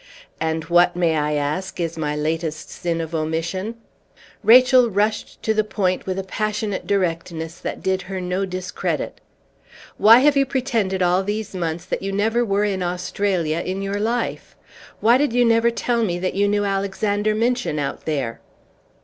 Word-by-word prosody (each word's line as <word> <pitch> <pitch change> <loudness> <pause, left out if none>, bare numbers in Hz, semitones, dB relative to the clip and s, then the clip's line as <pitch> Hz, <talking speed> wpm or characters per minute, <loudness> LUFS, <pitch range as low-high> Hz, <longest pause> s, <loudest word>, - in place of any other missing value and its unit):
"And 160 0 -1
what, 175 +1 +3
may 170 -2 +2
I 150 0 0
ask, 150 +7 -2
is 170 -1 -2
my 150 -2 -2
latest 155 +1 -3
sin 170 -1 -2
of 165 0 -6
omission?" 165 +7 -2 0.7
Rachel 250 +1 +6
rushed 210 +1 -1
to 220 - +2
the 215 0 +2
point 190 -4 -1
with 185 0 -2
a 195 - -2
passionate 210 0 -3
directness 170 -3 -2
that - - -5
did 190 0 0
her 190 -1 -3
no 180 +1 -2
discredit. 185 0 -3 0.8
"Why 225 +2 +8
have 290 +1 +4
you 275 -1 +3
pretended 230 -9 0
all 180 +1 +3
these 210 +1 -3
months 170 -2 -3
that - - -3
you 195 - -3
never 220 +4 +1
were 200 -2 +1
in 195 -2 -1
Australia 180 -2 -1
in 185 +3 -3
your 200 +1 -2
life? 230 +3 -2 0.5
Why 235 +3 +5
did 290 -5 +1
you 245 0 +4
never 230 0 +4
tell 235 0 0
me 175 -5 -1
that 185 +1 -2
you 200 +1 +2
knew 205 0 +1
Alexander 205 +2 0
Minchin 235 -7 0
out 140 -1 -3
there?" 135 -7 -2
190 Hz, 170 wpm, -22 LUFS, 170-215 Hz, 0.8 s, Why